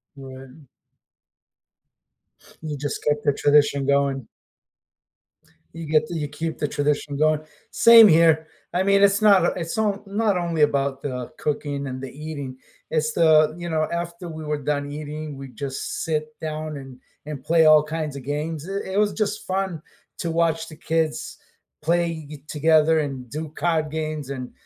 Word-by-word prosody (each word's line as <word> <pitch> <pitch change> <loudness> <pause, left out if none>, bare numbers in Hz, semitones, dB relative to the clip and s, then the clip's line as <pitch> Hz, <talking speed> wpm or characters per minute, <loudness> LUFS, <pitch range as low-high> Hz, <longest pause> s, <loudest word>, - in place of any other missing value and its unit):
Right. 135 0 -11 2.0
You 155 -2 -5
just 145 +1 -3
kept 150 0 +1
the 145 - +3
tradition 145 -1 +3
going. 140 -3 +1 1.5
You 165 0 -7
get 155 0 +2
to 175 - -6
you 150 -2 -2
keep 160 +3 -4
the 150 - -1
tradition 145 0 -1
going. 155 0 +2 0.3
Same 230 -1 +8
here. 160 -2 +4 0.3
I 180 +2 +1
mean, 200 0 +3
it's 200 0 +4
not 200 -5 +6
o - - +4
it's 165 +1 -4
on 210 -2 0
not 210 +2 -1
on 200 - +3
not - - +1
only 170 -3 -1
about 140 -2 +1
the 125 -3 -4
cooking 145 -1 -3
and 130 0 -6
the 135 - -6
eating, 145 -3 -7 0.3
it's 155 -1 0
the 155 -2 +5
you 175 0 -5
know, 155 -1 0
after 170 +1 -4
we 160 -1 -7
were 150 -1 -2
done 145 0 -1
eating, 150 0 -6
we 135 0 -8
just 135 +1 -5
sit 155 -1 -3
down 155 -1 -4
and 135 -2 -11 0.3
and 150 -3 -7
play 165 +1 +4
all 155 -1 +7
kinds 155 -1 -4
of 140 - -7
games, 150 +3 -4
i 195 -1 -4
it - - -1
was 210 -1 +2
just 210 -1 -2
fun 190 -4 -2 0.4
to 170 - -3
watch 165 -1 +1
the 155 - -11
kids 160 -1 -2 0.5
play 165 -1 0
it 150 -1 -11
together, 160 +1 +3
and 135 -4 -4
do 155 +5 -5
card 160 -3 0
games, 155 -3 -4
and 130 -2 -6
155 Hz, 175 wpm, -23 LUFS, 145-165 Hz, 2.0 s, Same